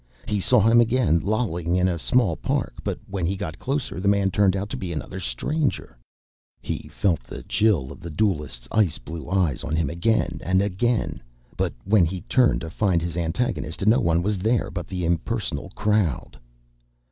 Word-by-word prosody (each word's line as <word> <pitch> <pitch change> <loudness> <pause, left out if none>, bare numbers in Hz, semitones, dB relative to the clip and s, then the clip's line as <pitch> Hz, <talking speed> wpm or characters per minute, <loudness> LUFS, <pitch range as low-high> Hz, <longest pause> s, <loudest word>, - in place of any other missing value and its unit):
He 105 -2 0
saw 105 - +4
him 115 +3 +6
again, 115 -8 +3
lolling 90 -5 -1
in 90 0 +3
a 85 -2 -1
small 110 -4 +2
park, - - -2
but - - -2
when 95 -4 -2
he 95 - -1
got 80 -6 -5
closer, 135 -6 -2
the 100 - -1
man 100 -1 +3
turned 95 0 +3
out 100 +1 -2
to - - -2
be 90 -2 -4
another 90 +3 -5
stranger. 135 - -2 0.6
He - - -5
felt 90 -6 +1
the - - -9
chill 90 -12 +1
of 70 - -10
the 85 - -7
duelist's 75 - -1
ice 100 -7 +2
blue 80 +5 -8
eyes 90 -9 +1
on 80 0 -2
him 80 -4 0
again 110 +7 0
and 95 +1 +2
again, 105 +4 0 0.3
but - - -1
when 100 -3 +5
he 90 +2 -4
turned 125 +5 +2
to 80 - -6
find 95 -2 +2
his 85 0 -4
antagonist, 85 +1 -2
no 110 +3 +5
one 85 +1 +2
was 105 0 0
there 110 +4 +1
but 90 -3 -5
the 90 -2 -3
impersonal 85 -1 -2
crowd. 100 - 0
95 Hz, 185 wpm, -24 LUFS, 80-105 Hz, 0.6 s, him